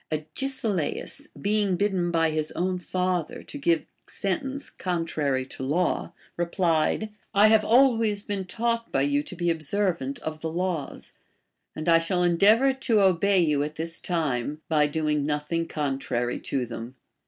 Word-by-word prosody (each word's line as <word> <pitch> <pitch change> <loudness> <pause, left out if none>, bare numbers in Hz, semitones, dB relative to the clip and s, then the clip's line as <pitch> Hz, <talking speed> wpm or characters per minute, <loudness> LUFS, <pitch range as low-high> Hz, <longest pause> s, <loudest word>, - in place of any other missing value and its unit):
Agesilaus, 215 - -2
being 205 -2 +1
bidden 185 -2 0
by 165 -1 +2
his 155 0 -1
own 180 +1 -1
father 185 +6 -2
to - - -9
give 170 - +2 0.2
sentence 270 +9 -3
contrary 155 -7 -1
to 130 - -10
law, 155 +7 0 0.3
replied: 170 +3 +1 0.2
I 210 +2 +7
have 220 -1 +6
been - - -6
always 230 -5 +4 0.2
taught 230 +2 -1
by 135 - +2
you 145 0 +2
to 185 - -9
be 175 -1 +1
observant 165 -3 -1
of 155 0 -5
the 160 - -2
laws, 175 -4 -3 0.6
and 155 - -5
I 165 -1 +6
shall 180 +2 0
endeavor 210 +10 +5
to 245 -4 +1
obey 190 0 +4
you 150 -4 +2
at 150 +1 -3
this 165 +1 -2
time, 150 -4 -1
by 150 -2 +3
domg 150 0 0
nothing 150 +3 -1
contrary 135 -4 -2
to 130 -2 -2
them. 120 +2 -7
170 Hz, 150 wpm, -26 LUFS, 150-200 Hz, 0.6 s, I